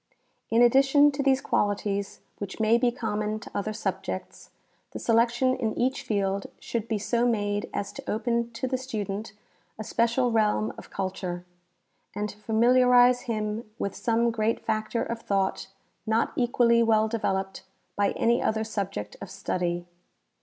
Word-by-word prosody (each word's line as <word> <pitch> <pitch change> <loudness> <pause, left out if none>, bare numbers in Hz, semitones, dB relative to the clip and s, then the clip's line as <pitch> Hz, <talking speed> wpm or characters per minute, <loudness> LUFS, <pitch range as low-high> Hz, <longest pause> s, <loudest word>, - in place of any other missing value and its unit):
In 230 +2 +5
addition 270 +4 +5
to 280 0 -3
these 270 -1 +3
qualities, 200 -3 -1 0.2
which 200 +1 -6
may 220 +2 +4
be 245 -1 +2
common 215 -2 -2
to - - -10
other 205 +2 -2
subjects, 215 - -5 0.4
the - - -4
selection 240 +3 +2
in 225 -4 -2
each 260 +3 0
field 200 -5 -1
should 230 -2 -3
be 220 - 0
so 235 +4 +1
made 205 -3 -1
as 200 - -3
to - - -8
open 235 +1 0
to 260 +3 -3
the 260 0 -1
student 215 -5 -4 0.4
a 215 - -5
special 235 +3 +1
realm 215 -1 +1
of - - -12
culture, 185 -2 -4 0.7
and 210 0 -2
to 205 - -11
familiarize 245 +3 +5
him 215 0 -2
with 200 - -3
some 235 0 +1
great 225 0 -1
factor 220 +1 -1
of 230 0 -4
thought 195 -2 -1 0.4
not 225 +1 +1
equally 240 -1 +3
well 220 -1 +3
developed 195 -4 -2 0.3
by 205 0 +2
any 235 +1 +2
other 220 0 0
subject 195 - -4
of 200 - -7
study. 175 -2 -2
220 Hz, 155 wpm, -27 LUFS, 205-240 Hz, 0.7 s, In